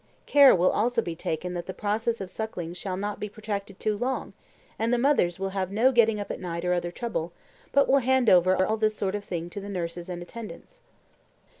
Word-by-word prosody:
Care 280 -2 +7
will 180 0 +3
also 235 +3 +1
be 170 -7 -2
taken 165 +3 -3
that 175 -1 -5
the 185 - -6
process 220 +3 -1
of 185 -2 -5
suckling 185 -6 -4
shall 185 +1 -4
not 205 +1 -3
be 210 - -4
protracted 200 -2 -5
too 215 -1 0
long; 250 +5 -3 0.5
and 225 +1 +1
the 245 - +3
mothers 240 -10 +2
will 195 0 -2
have 190 -1 -2
no 230 +6 +4
getting 225 -3 +3
up 205 - -4
at - - -5
night 170 -1 -4
or 180 - +2
other 175 -1 -1
trouble, 175 -4 -4 0.4
but 280 0 +4
will 275 - +5
hand 260 -1 +2
over 185 -1 +5
all 220 +3 0
this 215 0 +1
sort 195 -2 -2
of 205 -1 -3
thing 170 -3 -4
to 200 - -6
the 200 - -7
nurses 175 -2 -4
and 175 -1 -5
attendants. 235 - -10
205 Hz, 220 wpm, -27 LUFS, 180-230 Hz, 0.5 s, Care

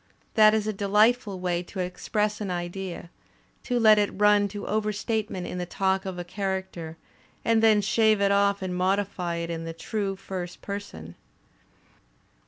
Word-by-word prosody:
That 215 -1 +6
is 215 -1 0
a 215 - -1
delightul 210 +1 +2
way 180 -1 -1
to 180 +2 -9
express 210 +4 -2
an 200 - -3
idea, 175 0 -5 0.5
to 245 -1 0
let 215 -2 +6
it 205 - +2
run 210 -1 +5
to 205 +1 -7
overstatement 215 -2 -2
in 180 - -5
the 180 - -2
talk 190 +1 0
of 185 -1 -5
a 175 - -4
character, 190 -3 -4 0.5
and 225 -1 +3
then 220 -2 +5
shave 215 0 +3
it 200 0 +3
off 200 0 +2
and 180 -1 -3
modify 185 -1 0
it 170 0 -3
in 165 0 -4
the 165 0 -5
true 195 +3 -3
first 185 -2 -7
person! 200 - -7
195 Hz, 165 wpm, -26 LUFS, 180-210 Hz, 0.5 s, That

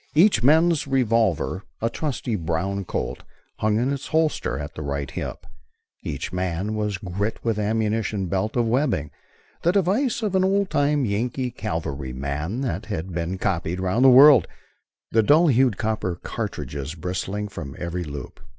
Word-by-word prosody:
Each 170 - +5
man's 160 +4 +4
revolver, 115 - +1 0.2
a 115 - 0
trusty 125 -2 -3
brown 95 +3 -2
Colt, - - -3 0.4
hung 105 0 +2
in 125 +5 +1
its 140 0 -5
holster 160 - 0
at 75 +1 -6
the - - -7
right 70 -1 -3
hip. - - -5 0.6
Each - - -5
man 90 +3 -2
was 105 -2 -1
girt 100 +3 -3
with 115 -2 0
ammunition 110 -1 0
belt 95 +4 -1
of 120 -2 +2
webbing, 115 - 0 0.5
the 175 - +3
device 210 - +1
of 205 -3 -1
an 190 0 +3
old 195 0 +1
time 145 -1 +2
Yankee 120 +4 -1
cavalryman 75 - -4
that 130 - -3
has 100 -7 -2
been 90 0 -3
copied 90 -2 -1
round 95 +7 +1
the 135 - +9
world, 135 +3 +8 0.6
the 110 - +4
dull 155 +9 +5
hued 125 -5 +3
copper 110 -5 -1
cartridges 70 +2 -4
bristling 95 +4 -3
from 75 -9 -7
every 90 +1 -3
loop. 70 -4 -8
105 Hz, 155 wpm, -24 LUFS, 90-135 Hz, 0.6 s, the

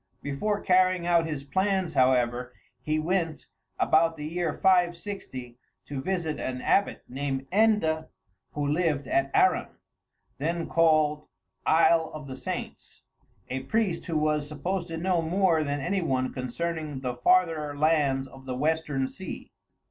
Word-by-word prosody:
Before 205 +10 -1
carrying 185 -2 +3
out 170 -2 +3
his 150 -3 -4
plans, 190 +3 0
however, 125 -2 +2 0.3
he 155 0 -1
went, 165 -1 -1 0.3
about 165 +1 +3
the 150 - -6
year 170 +1 -1
560, 175 -9 0 0.3
to 140 -2 -5
visit 170 -2 -2
an 130 -1 -3
abbot 200 +9 +1
named 135 0 -3
Enda, 200 -7 +2 0.5
who 145 -1 -2
lived 150 -2 0
at 135 0 +1
Arran, - - +4 0.7
then 165 +3 -1
called 155 -2 +2 0.4
Isle 160 0 +4
of 150 -2 -7
the 130 -1 -7
Saints, - - -7 0.4
a 130 - -3
priest 180 +5 -1
who 165 -3 -1
was 150 -1 +1
supposed 170 +5 -3
to 165 -1 -5
know 175 0 +1
more 165 -1 +2
than 145 0 -2
any 190 +8 0
one 130 -5 -1
concerning 150 +2 -4
the 125 -2 -3
farther 155 0 +2
lands 145 -3 +2
of 135 0 -14
the 130 -1 -3
western 150 -1 0
sea. 190 +7 -8
155 Hz, 140 wpm, -27 LUFS, 140-175 Hz, 0.7 s, Arran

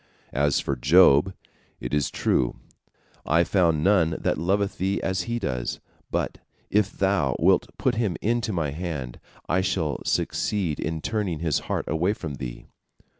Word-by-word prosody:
As 70 +1 +2
for 70 - -2
Job, 75 +5 +5 0.4
it - - -6
is 75 -1 +1
true, - - 0 0.7
I 85 +3 +3
found 85 -4 +2
none 90 -5 +3
that - - 0
loveth 100 +4 0
Thee 95 +2 0
as 95 -1 -1
he 120 - 0
does, 65 - -3 0.3
but - - -2 0.3
if 105 -1 +2
Thou 95 -9 +1
wilt - - +3
put 130 - +1
him 110 -8 -1
into 115 0 0
my 80 -7 -1
hand, 75 -6 -5 0.3
I 90 +3 +2
shall 80 -5 -1
succeed 90 -8 -1
in 80 0 -3
turning 105 -6 -1
his 80 -2 0
heart - - -1
away 85 +6 +1
from 80 -8 -6
Thee." - - -6
85 Hz, 155 wpm, -25 LUFS, 75-100 Hz, 0.7 s, Job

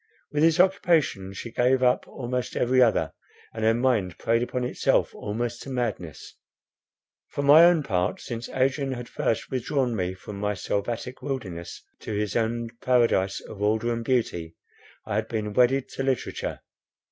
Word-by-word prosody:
With 150 - 0
this 165 +1 +4
occupation 170 - +2
she 115 +4 -7
gave 130 +2 +2
up 125 0 +2
almost 125 0 -4
every 130 +1 +3
other; 120 -3 +3 0.4
and 110 -1 -4
her 110 +1 +4
mind 115 -9 +1
preyed 115 +1 +1
upon 125 +1 -2
itself 125 - +1
almost 115 +3 -4
to - - -8
madness. 110 - -4 0.9
For 140 - -4
my 150 +4 +8
own 170 -3 +4
part, 90 -7 -1
since 115 -1 -6
Adrian 135 +1 0
had 120 -1 -6
first 115 0 -2
withdrawn 130 -1 0
me 90 -2 -2
from 100 +1 -9
my 105 0 -1
selvatic 115 +6 -3
wilderness 95 -12 -5 0.2
to 110 - -6
his 105 -1 -2
own 115 0 0
paradise 115 -6 +2
of 105 - -10
order 110 +3 +1
and 115 0 -3
beauty, 100 -10 -1 0.5
I - - -4
had 110 0 -1
been 105 -2 -3
wedded 125 +3 +3
to - - -5
literature. 135 -2 -2
120 Hz, 160 wpm, -26 LUFS, 105-130 Hz, 0.9 s, my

